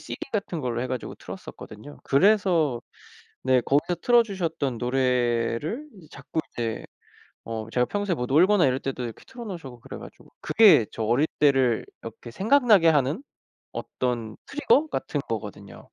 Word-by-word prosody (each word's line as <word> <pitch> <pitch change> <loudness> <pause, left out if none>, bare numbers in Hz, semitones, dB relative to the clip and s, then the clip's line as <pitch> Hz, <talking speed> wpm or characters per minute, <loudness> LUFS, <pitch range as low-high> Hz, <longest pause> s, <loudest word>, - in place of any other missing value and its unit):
CD - - -7 0.2
같은 195 -6 -2
걸로 120 -2 -2
해 - - -2
가지고 130 -2 -4
틀었었거든요. 110 +8 -10
그래서 165 - +3 0.6
네 130 -1 +3
거기서 145 +7 +1
틀어 240 -1 +5
주셨던 165 - -3
노래를 125 - 0 0.3
자꾸 140 +4 -5
이제 115 -2 -3 0.6
어 110 -1 -5
제가 125 0 +2
평소에 205 -1 -1
뭐 125 - -3
놀거나 175 +7 +4
이럴 130 0 +1
때도 130 -2 -4
이렇게 115 -2 -7
틀어 245 -2 -9
놓으시고 145 - -8
그래 - - -9
가지고 - - -13
그게 210 - +6
저 110 - -4
어릴 120 +7 +2
때를 135 -5 +3 0.2
이렇게 115 +1 -9
생각나게 215 - +4
하는 150 - +2 0.5
어떤 120 -4 -3
trigger 295 +1 +2
같은 145 - -2
거거든요. 105 -3 -6
135 Hz, 355 characters per minute, -25 LUFS, 120-185 Hz, 0.6 s, 그게